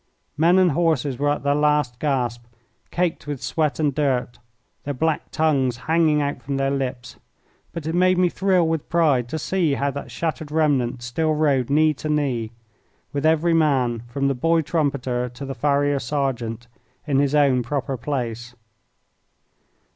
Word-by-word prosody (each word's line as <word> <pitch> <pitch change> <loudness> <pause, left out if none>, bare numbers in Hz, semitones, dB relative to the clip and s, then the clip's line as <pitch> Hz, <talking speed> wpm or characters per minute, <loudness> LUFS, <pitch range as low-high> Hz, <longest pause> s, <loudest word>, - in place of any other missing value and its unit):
Men 170 +4 +4
and 185 -2 +4
horses 145 -5 0
were 145 0 +1
at 145 - -1
their 140 0 +2
last 150 -4 +1
gasp, 120 -5 -1 0.4
caked 175 -4 -2
with 145 -2 -4
sweat 155 +2 -1
and 150 -3 +1
dirt, 130 -4 -1 0.4
their 145 0 -4
black 160 +3 -1
tongues 135 -6 +1
hanging 160 -2 +3
out 145 0 -3
from 140 0 -3
their 135 0 0
lips; 130 -2 -4 0.5
but 165 -3 -7
it 160 - -2
made 185 +1 +3
me 180 0 +4
thrill 185 -1 +1
with 160 -2 -2
pride 145 -8 +2
to 160 - -3
see 165 -3 0
how 140 +1 -1
that 140 -1 -7
shattered 150 +3 -3
remnant 135 -6 +1
still 155 +6 0
rode 140 -5 +1
knee 155 +2 +3
to 155 +2 -6
knee, 135 -7 0 0.6
with 145 +2 +1
every 160 +2 +3
man, 130 -8 +2
from 140 +3 -1
the 140 - +1
boy 165 +6 +2
trumpeter 135 -6 -1
to 125 +3 -8
the 135 - -4
farrier 145 0 +1
sergeant, 125 -4 -3 0.4
in 140 -3 +1
his 140 +1 +1
own 140 -4 +4
proper 135 +2 -3
place. 120 -2 -4
145 Hz, 165 wpm, -22 LUFS, 130-155 Hz, 0.6 s, Men